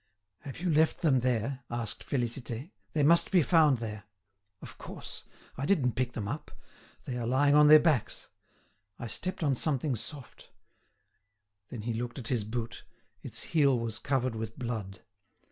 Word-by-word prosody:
"Have 135 0 -9
you 175 -2 0
left 160 +3 +2
them 140 -5 +4
there?" 125 +1 0
asked 120 -2 -4
Félicité; 120 - -3 0.2
"they 150 - +2
must 170 +4 +5
be 180 -5 +4
found 155 -4 +4
there." 105 -2 -6 0.5
"Of - - -11
course! - - -8 0.3
I 135 +2 -2
didn't 145 -11 +3
pick 125 0 -2
them 105 -3 -4
up. 145 +8 -5 0.6
They 125 -1 -4
are 115 - -2
lying 140 +3 +3
on 150 0 +7
their 155 +1 +10
backs. 150 -7 0 0.7
I - - -6
stepped 185 - -3
on 140 -3 +2
something 140 0 0
soft——" 130 +5 -8 1.2
Then 115 -4 -7
he 115 +1 -2
looked 120 +3 -4
at 120 -4 -5
his 120 -5 0
boot; 115 +1 -5 0.4
its - - -5
heel 140 -5 +4
was 115 -1 -3
covered 130 -3 0
with 110 0 -5
blood. 110 -7 -5
130 Hz, 160 wpm, -30 LUFS, 115-150 Hz, 1.2 s, their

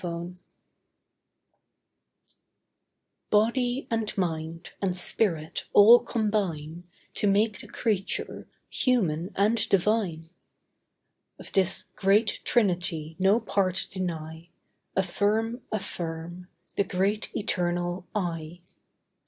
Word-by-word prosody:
AFFIRM 175 +1 -5 2.9
Body 245 +5 +1
and 225 -2 -2
mind, 165 -1 -3
and 185 -2 0
spirit, 170 -4 +2
all 225 +4 +9
combine 185 -8 -2 0.3
To 205 - +1
make 205 +1 +2
the - - -10
Creature, 205 -5 -2 0.2
human 185 - 0
and 215 +4 +2
divine. 185 -5 0 1.1
Of - - -11
this 190 0 +2
great 205 +3 +2
trinity 175 -7 0
no 195 +4 +4
part 190 -4 0
deny. 165 -3 -5 0.5
Affirm, 215 +6 0
affirm, 175 -4 -5 0.3
the - - +3
Great 195 +3 -1
Eternal 175 -3 -1
I. 170 -3 -3
190 Hz, 85 wpm, -27 LUFS, 170-215 Hz, 2.9 s, all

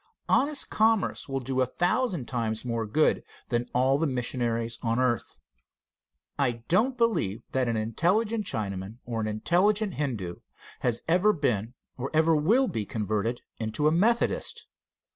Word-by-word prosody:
Honest 285 0 +2
commerce 220 -7 +2
will 135 0 -2
do 130 +1 -1
a 130 - +2
thousand 180 - 0
times 115 -2 -2
more 115 -2 -2
good 155 +9 +2 0.3
than 120 0 -1
all 130 +2 +2
the 165 - +1
missionaries 120 -2 -1
on 115 -1 0
earth. 125 -2 0 1.0
I 120 -4 0
do 200 +7 +4
not 260 -1 -6
believe 215 - 0
that 130 -2 +1
an 115 -1 0
intelligent 200 - +1
Chinaman 100 0 -4
or 115 -2 -3
an 110 - -1
intelligent 190 - +1
Hindoo 110 -12 -3 0.4
has 120 -1 -1
ever 185 +6 +4
been 120 - -1 0.2
or 135 +3 -2
ever 160 +1 +4
will 220 - +3
be 110 - -2
converted 110 +2 -2 0.2
into 110 +7 0
a - - +4
Methodist. 220 +8 +1
130 Hz, 150 wpm, -27 LUFS, 115-180 Hz, 1.0 s, do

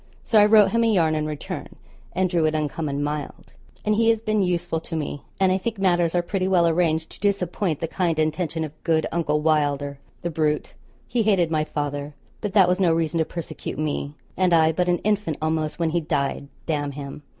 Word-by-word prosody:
So 220 - +4
I 205 - +7
wrote 210 -2 +6
him 230 0 +2
a 225 - +3
yarn 165 -6 +3
in 155 0 -1
return, 150 -1 -6 0.4
and 185 0 +1
drew 170 -3 +1
it 155 0 +1
uncommon 150 -1 -2
mild. 150 -1 -5 0.3
And 215 - +3
he 225 +2 +3
has 225 -1 +3
been 215 -1 0
useful 175 -3 0
to 165 +1 -7
me; 145 -2 -3 0.2
and 190 -1 +4
I 190 - +1
think 220 +3 -3
matters 175 -3 +2
are 175 - +2
pretty 185 +1 -1
well 175 -3 +4
arranged 160 -1 +1
to - - -13
disappoint 190 -4 0
the 165 - -1
kind 170 -1 0
intention 155 +1 -1
of 155 0 -8
good 160 -1 +2
Uncle 150 -3 0
Wylder 145 -2 +1 0.2
the 175 - -2
brute; 150 -1 -1 0.3
he 240 - 0
hated 190 -6 +2
my 155 -1 +2
father, 145 -1 -4 0.3
but 205 -3 -3
that 190 -3 +7
was 180 +1 +1
no 180 -3 +4
reason 165 0 0
to 160 - +2
persecute 170 -1 -6
me, 150 -1 -2 0.2
and 185 -2 +2
I 160 -1 +5
but 180 +2 0
an 175 - +3
infant, 205 -7 0
almost, 155 -1 -1
when 165 -2 0
he 170 +1 +1
died, 140 -2 -1 0.2
d 165 - 0
him. 145 -1 -4
165 Hz, 215 wpm, -24 LUFS, 155-185 Hz, 0.4 s, I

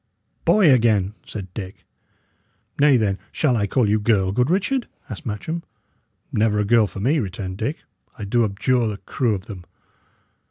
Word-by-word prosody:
"Boy 185 -10 +6
again!" 110 -5 +2
said 95 -4 -7
Dick. 95 -3 -8 0.9
"Nay, 145 -2 +6
then, 100 -4 0
shall 140 -6 +1
I 100 -3 +1
call 120 +1 +2
you 105 +1 +2
girl, 105 -3 +2
good 125 +6 +1
Richard?" 205 +8 0 0.2
asked 160 - -7
Matcham. 160 +11 -4 0.7
"Never 105 0 +2
a 105 - +1
girl 115 0 +4
for 95 - -9
me," 140 +10 +2
returned 95 -3 -4
Dick. 140 +8 -3 0.3
"I - - -6
do 115 +4 +2
abjure 115 +4 +1
the 105 -2 -3
crew 115 +1 -1
of 95 - -7
them!" 95 -5 -9
110 Hz, 165 wpm, -22 LUFS, 100-130 Hz, 0.9 s, Boy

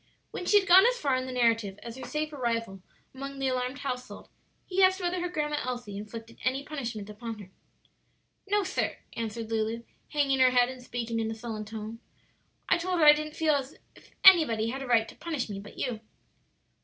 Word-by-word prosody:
When 360 - -5
she 415 - +6
had 390 - -5
gone 375 +5 +8
as - - +1
far 280 - +1
in 255 0 -2
the - - -5
narrative 230 -5 +1
as 235 -1 -7
her 265 - -8
safe 305 0 -3
arrival 230 -7 -2 0.3
among 275 +1 -7
the 270 -1 0
alarmed 255 +1 -2
household, 255 -3 -6 0.4
he 380 +1 0
asked 375 0 +5
whether 355 0 -1
her 355 - -2
Grandma 300 -3 -1
Elsie 245 -5 -5
inflicted 225 +2 -8
any 265 +2 0
punishment 240 -9 -5
upon 225 +1 -7
her. 195 -3 -12 1.0
"No, 410 0 +2
sir," 380 +1 -2 0.2
answered 225 0 -5
Lulu, 225 +1 -1 0.3
hanging 280 -3 +1
her 255 -1 +7
head 245 -1 +3
and 260 -1 -8
speaking 235 -2 -3
in 220 -1 -1
a 225 - -4
sullen 220 -2 -6
tone. 220 +1 -7 0.7
"I - - +3
told 365 +1 -1
her 310 - +5
I 295 - +11
didn't 305 +1 -4
feel 315 -1 +2
as 275 -1 -2 0.2
if - - -18
anybody 305 - +7
had 265 +3 -4
any 270 - -6
right 230 -2 +4
to - - -11
punish 310 -9 -4
me 195 - -5
but 205 +1 -12
you." 245 -4 -2
255 Hz, 205 wpm, -28 LUFS, 225-300 Hz, 1.0 s, I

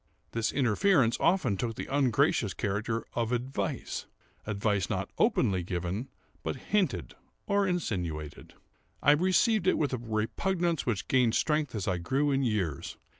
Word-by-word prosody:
This 115 0 0
interference 130 - +3
often 170 - +2
took 115 +2 -2
the - - -5
ungracious 135 -5 +2
character 110 +3 -2
of 115 -1 -1
advice; 125 +2 -3 0.4
advice 105 -2 0
not - - -2
openly 95 -2 +2
given, 90 +6 -3 0.3
but - - -3
hinted 135 - -1 0.3
or 200 -1 +2
insinuated. 90 - -3 0.5
I 145 - +7
received 185 +5 +3
it - - +4
with 145 -3 0
a 125 - -1
repugnance 160 - -1
which 110 -5 -1
gained 125 -4 +3
strength 150 -5 +1
as 100 -3 -3
I 90 -2 0
grew 135 +12 +1
in 135 0 +2
years. 100 - -2
120 Hz, 140 wpm, -29 LUFS, 100-150 Hz, 0.5 s, I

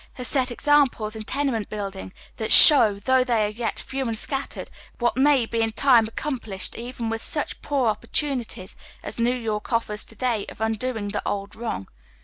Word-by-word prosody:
has 250 - +1
set 260 -3 +3
examples 250 -5 +1
in 220 - -6
tenement 250 -2 -2
building 200 -3 -6 0.3
that 220 - -3
show, 225 -9 +8
though 260 +5 +2
they 235 -4 +1
are 210 - -3
yet 225 +1 -4
few 265 -1 -4
and 225 -1 -2
scattered, 270 +4 -4 0.3
what 240 0 0
may 270 -1 +3
in 225 0 -1
time 240 -1 +4
be - - -5
accomplished 225 -8 -3
even 235 0 -6
with 225 0 -3
such 295 +4 0
poor 260 -7 0
opportu 275 +7 -2
nities 200 -6 -6 0.3
as - - -5
New 240 +2 +1
York 220 -1 -4
offers 225 -2 0
to 225 - -8
day 235 -3 -1
of - - -13
undoing 220 -1 -2
the 210 - -3
old 200 0 -4
wrong. 225 - -5
230 Hz, 185 wpm, -23 LUFS, 215-260 Hz, 0.3 s, show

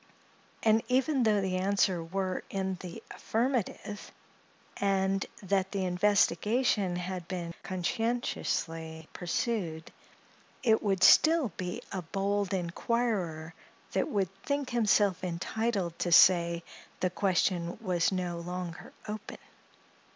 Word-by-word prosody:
and 220 0 +4
even 265 +3 +2
though 215 -3 +3
the 185 -1 -1
answer 190 -2 +1
were 185 +2 -2
in 190 -1 -2
the 175 -2 -8
affirmative, 225 -3 -2 0.7
and 195 -1 +1 0.2
that 190 0 0
the 195 -2 -1
investigation 200 +2 +2
had 180 -1 -4
been 175 -2 -4
conscientiously 170 -5 -2
pursued, 175 -3 -2 0.7
it 220 -3 +4
would 195 -3 0
be - - +8
still 315 -7 +6 0.4
a 190 - -3
bold 200 +3 -1
inquirer 180 -3 -1 0.4
that - - 0
would 195 - -1
think 280 0 -2
himself 205 -5 +2
entitled 185 +1 -2
to 175 - -1
say, 170 -1 +6 0.4
the 185 - +1
question 180 -2 0
was 180 -6 +1
no 180 -2 -2
longer 175 -1 -6 0.2
open. 210 0 -6
190 Hz, 110 wpm, -30 LUFS, 175-215 Hz, 0.7 s, be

